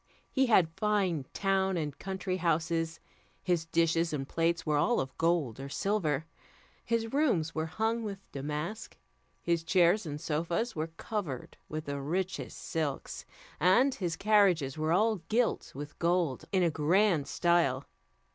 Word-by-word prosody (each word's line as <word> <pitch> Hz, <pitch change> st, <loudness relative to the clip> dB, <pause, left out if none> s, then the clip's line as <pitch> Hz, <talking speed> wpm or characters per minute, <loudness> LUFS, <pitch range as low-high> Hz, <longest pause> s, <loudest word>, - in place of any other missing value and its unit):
He 265 Hz, -1 st, +2 dB
had 180 Hz, -8 st, +4 dB
fine 195 Hz, -, 0 dB
town 190 Hz, -1 st, +1 dB
and 150 Hz, -3 st, -3 dB
country 190 Hz, -1 st, -3 dB
houses, 165 Hz, -1 st, 0 dB, 0.4 s
his 175 Hz, -3 st, 0 dB
dishes 165 Hz, 0 st, +2 dB
and 135 Hz, -3 st, -3 dB
plates 165 Hz, +1 st, 0 dB
were 150 Hz, -2 st, +2 dB
all 240 Hz, +10 st, +2 dB
of 130 Hz, -, -4 dB
gold 165 Hz, -8 st, +1 dB
or 135 Hz, +1 st, -6 dB
silver, 160 Hz, -3 st, 0 dB, 0.6 s
his 230 Hz, 0 st, -1 dB
rooms 210 Hz, -, +2 dB
were 160 Hz, 0 st, -2 dB
hung 220 Hz, +6 st, -1 dB
with 205 Hz, -3 st, -4 dB
damask, 150 Hz, +10 st, -5 dB, 0.5 s
his 170 Hz, -1 st, +1 dB
chairs 175 Hz, +3 st, +3 dB
and 145 Hz, 0 st, -4 dB
sofas 170 Hz, +10 st, -1 dB
were 155 Hz, 0 st, -2 dB
covered 185 Hz, -, -4 dB
with 155 Hz, 0 st, -4 dB
the 140 Hz, 0 st, -3 dB
richest 185 Hz, +6 st, -3 dB
silks, 155 Hz, -5 st, -4 dB, 0.3 s
and 215 Hz, -, +4 dB
his 175 Hz, -9 st, -2 dB
carriages 190 Hz, -9 st, +3 dB
were 155 Hz, +1 st, -1 dB
all 215 Hz, +5 st, +3 dB
gilt 235 Hz, +1 st, +1 dB
with 145 Hz, +1 st, -8 dB
gold 170 Hz, -5 st, +1 dB
in 190 Hz, -2 st, +3 dB
a 170 Hz, -, +3 dB
grand 160 Hz, +1 st, +2 dB
style. 165 Hz, -7 st, +2 dB
170 Hz, 145 wpm, -30 LUFS, 155-195 Hz, 0.6 s, had